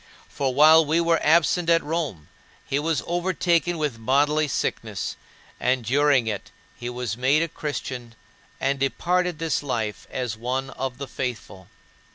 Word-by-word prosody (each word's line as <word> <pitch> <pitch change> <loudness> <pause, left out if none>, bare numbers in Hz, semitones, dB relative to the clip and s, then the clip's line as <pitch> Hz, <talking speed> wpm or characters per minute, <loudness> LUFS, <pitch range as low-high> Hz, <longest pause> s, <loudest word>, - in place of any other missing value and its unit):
" - - -24
For 135 -2 -2
while 155 +4 +7
we 155 +2 +1
were 170 -1 +2
absent 170 +2 +3
at 165 0 +4
Rome, 145 - -3 0.4
he 140 - 0
was 160 +1 0
overtaken 175 -1 +1
with 140 -8 -3
bodily 145 +5 +2
sickness, 135 - -3 0.4
and 125 -1 +1
during 140 0 +3
it 105 -3 -4 0.3
he 120 0 -5
was 125 -3 -3
made 135 +6 +3
a - - -1
Christian 130 -7 -5 0.4
and 135 +1 0
departed 180 +5 0
this 165 0 -1
life 115 -7 -3
as 125 -4 -3
one 130 +4 -3
of 130 -2 -4
the 140 0 -6
faithful. 110 -9 -5
140 Hz, 155 wpm, -24 LUFS, 125-160 Hz, 0.4 s, while